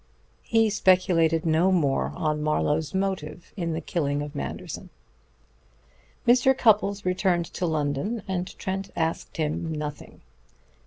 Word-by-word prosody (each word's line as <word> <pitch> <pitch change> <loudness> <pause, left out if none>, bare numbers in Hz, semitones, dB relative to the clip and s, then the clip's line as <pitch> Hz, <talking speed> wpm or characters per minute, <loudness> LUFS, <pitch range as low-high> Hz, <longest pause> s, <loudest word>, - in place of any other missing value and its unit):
He 225 -1 +2
speculated 180 -4 +3
no 165 +4 +3
more 140 - +1
on 150 - -1
Marlowe's 150 0 0
motive 190 -5 -3
in 170 -5 -2
the 160 - -3
killing 145 -3 -1
of 145 0 -7
Manderson. 145 - -6 1.4
Mr. 255 +2 +5
Cupples 205 -4 +3
returned 180 -1 +1
to 180 - -1
London, 155 +8 -1
and 185 -1 -3
Trent 195 +1 -3
asked 165 0 -2
him 160 +1 -1
nothing. 150 -1 -6
170 Hz, 120 wpm, -26 LUFS, 150-190 Hz, 1.4 s, Mr